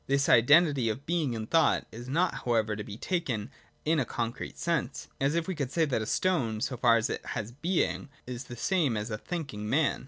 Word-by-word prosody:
This 140 0 +2
identity 140 0 +5
of 120 +6 -4
being 160 -7 0
and 110 -1 -4
thought 165 +3 +3
is 120 +2 -9
not 170 +6 0
however 110 -3 +1
to 105 - -5
be 100 +1 -8
taken 135 - -2 0.3
in 160 +1 +3
a - - +2
concrete 120 +1 -4
sense, 170 -1 -2
as 140 +3 +1
if 170 -1 0
we 190 - -1
could 140 -6 -3
say 165 +1 +2
that 130 -6 0
a 110 - -4
stone, 130 -13 +1
so 125 - -2
far 120 -1 +4
as 110 - 0
it - - -4
has 110 +2 -4
being, 160 +1 -1 0.2
is 125 0 -6
the 120 - -9
same 155 - +1
as 105 +2 -4
a 105 - -2
thinking 135 -13 -5
man. 145 +3 +2
135 Hz, 220 wpm, -29 LUFS, 115-160 Hz, 0.3 s, identity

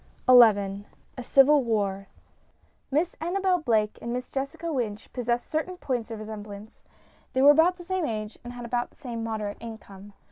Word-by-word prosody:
XI 205 -5 +5 0.3
A 255 - -6
CIVIL 275 +3 +5
WAR 200 -4 -1 0.8
Miss 315 +6 0
ANNABEL 365 +2 +1
BLAKE 220 -8 0
and 235 - -4
Miss 250 +1 -4
Jessica 320 +5 -4
Wynch 220 -6 -4
possessed 240 -1 -1
certain 340 +4 -3
points 245 -8 -3
of 225 - -5
resemblance. 215 0 -9 0.5
They 260 - +2
were 285 - +9
about 325 +5 +4
the 355 - -11
same 370 -2 -1
age, 215 -1 -4
and 245 0 -8
had 245 -1 -8
about 240 0 -2
the - - -27
same 235 -5 -6
moderate 215 -2 -4
income. 205 -3 -11
240 Hz, 170 wpm, -26 LUFS, 215-290 Hz, 0.8 s, were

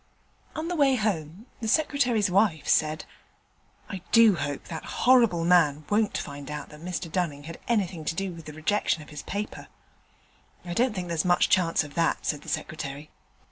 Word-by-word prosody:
On 315 +1 -3
the 355 - -2
way 280 -4 +4
home 195 -3 -2
the 225 - -4
Secretary's 245 - +2
wife 185 -5 +2
said, 155 0 +2 0.8
'I 190 -3 -6
do 230 -4 +7
hope 145 -4 -3
that 160 -2 -7 0.2
horrible 230 -10 +5
man 155 -4 +4
won't 210 0 +2
find 140 0 -7
out 150 -1 -6
that 150 0 -13
Mr 175 -1 -4
Dunning 155 -6 -2
had 165 +2 -9
anything 190 -8 0
to 160 - -1
do 195 0 -3
with 165 -2 -11
the 150 - -8
rejection 155 0 0
of - - -16
his 150 -2 -7
paper.' 205 +2 -5 1.0
'I 175 - -4
don't 240 +3 +1
think 180 -2 -3
there's 165 -2 0
much 175 -1 +3
chance 170 -4 +3
of 145 -1 -10
that,' 165 +1 0
said 150 -2 -1
the - - -9
Secretary. 145 -1 -5
175 Hz, 180 wpm, -27 LUFS, 155-210 Hz, 1.0 s, do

